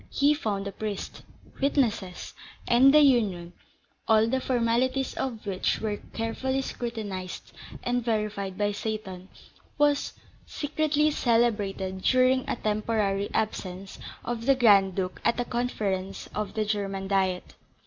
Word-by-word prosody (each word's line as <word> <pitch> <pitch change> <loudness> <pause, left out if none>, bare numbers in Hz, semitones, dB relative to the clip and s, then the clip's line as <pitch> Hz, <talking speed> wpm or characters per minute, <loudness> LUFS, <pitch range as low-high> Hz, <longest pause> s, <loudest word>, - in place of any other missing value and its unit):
He 285 +2 +3
found 205 -8 -2
a - - -4
priest, 210 -1 -5 0.4
witnesses; 230 -10 0 0.3
and 255 +3 +6
the 300 +1 +7
union 205 -11 +2 0.5
(all 220 0 +5
the 260 +3 0
formalities 255 +2 +1
of 235 -5 -4
which 190 -2 0
were 210 -1 -2
carefully 260 +6 -3
scrutinised 210 -8 -5 0.3
and 245 0 0
verified 210 -4 -2
by 205 0 +1
Seyton) 205 -3 -5 0.5
was 290 -1 +2 0.3
secretly 300 0 +1
celebrated 210 -7 0
during 255 +2 +3
a - - 0
temporary 210 -2 0
absence 195 -3 -3 0.3
of 235 0 -4
the 275 - +6
Grand 200 -7 +5
Duke 185 -1 -3
at 235 - +2
a 245 - 0
conference 205 -6 -2
of 210 -1 -4
the 215 -1 0
German 195 -2 -2
Diet. 190 -2 0
220 Hz, 130 wpm, -27 LUFS, 195-250 Hz, 0.5 s, the